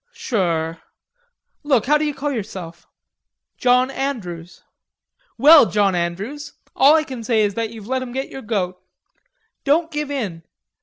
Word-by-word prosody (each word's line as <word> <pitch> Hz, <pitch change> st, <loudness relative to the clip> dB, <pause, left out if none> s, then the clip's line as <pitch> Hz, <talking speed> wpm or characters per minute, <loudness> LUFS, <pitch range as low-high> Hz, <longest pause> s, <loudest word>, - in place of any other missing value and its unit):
"Sure.... 165 Hz, -7 st, -2 dB, 0.8 s
Look, 270 Hz, -7 st, +2 dB
how 300 Hz, +3 st, +3 dB
do 310 Hz, -, 0 dB
you 295 Hz, -2 st, -2 dB
call 290 Hz, +1 st, -2 dB
yourself?" 185 Hz, -8 st, -7 dB, 0.7 s
"John 250 Hz, +1 st, +3 dB
Andrews." 180 Hz, -12 st, -5 dB, 0.7 s
"Well, 300 Hz, -3 st, +8 dB
John 205 Hz, -2 st, +2 dB
Andrews, 190 Hz, -, -4 dB, 0.2 s
all 285 Hz, +3 st, +6 dB
I 315 Hz, -, +3 dB
can 260 Hz, -6 st, -7 dB
say 225 Hz, -1 st, +2 dB
is 205 Hz, -1 st, 0 dB
that 225 Hz, +1 st, -2 dB
you've 220 Hz, -2 st, -10 dB
let 260 Hz, +3 st, -1 dB
'em 255 Hz, -1 st, -6 dB
get 265 Hz, +2 st, -4 dB
your 270 Hz, -, -8 dB
goat. 185 Hz, -5 st, -3 dB, 0.8 s
Don't 320 Hz, +4 st, +2 dB
give 300 Hz, -1 st, -3 dB
in. 210 Hz, -13 st, -4 dB
235 Hz, 150 wpm, -21 LUFS, 190-280 Hz, 0.8 s, Well